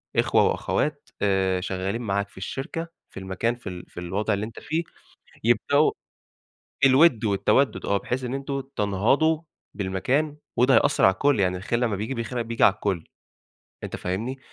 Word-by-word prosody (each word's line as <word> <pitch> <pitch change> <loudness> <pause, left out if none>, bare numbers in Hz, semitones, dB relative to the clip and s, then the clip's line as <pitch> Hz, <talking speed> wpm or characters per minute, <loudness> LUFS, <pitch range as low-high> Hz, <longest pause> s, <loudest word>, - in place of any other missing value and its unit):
إخوة - - +4
وأخوات 145 -1 -1
آآ، 95 -2 +2
شغالين 95 +5 -3
معاك 100 -2 -1
في - - -20
الشركة 140 - -4 0.2
في - - -9
المكان 95 +5 -1
في 120 -5 -8
ال 90 -1 -8
في - - -9
الوضع 100 +5 -1
اللي 100 +2 -1
أنت 110 - -9
فيه، 165 +2 -2 0.6
يبدأوا 130 +6 +3 0.9
الود 130 -3 +5
والتودّد 110 +6 +2
آه، 100 - +2
بحيث 125 +6 -3
إن 125 - -3
أنتم 135 0 -3
تنهضوا 125 - +2 0.3
بالمكان 125 +11 -1 0.2
وده 125 +1 +4
هيأثّر - - +4
على 95 - +7
الكل، 140 +2 +2
يعني 90 -1 +1
الخير 100 +6 -1
لمّا 115 -4 0
بييجي 110 +6 -3
الخير 120 +1 -2
بييجي 115 0 +1
على 95 - +6
الكل، 95 -5 -2 0.8
أنت - - -4
فاهمني؟ 110 +9 -3
110 Hz, 160 wpm, -25 LUFS, 95-135 Hz, 0.9 s, على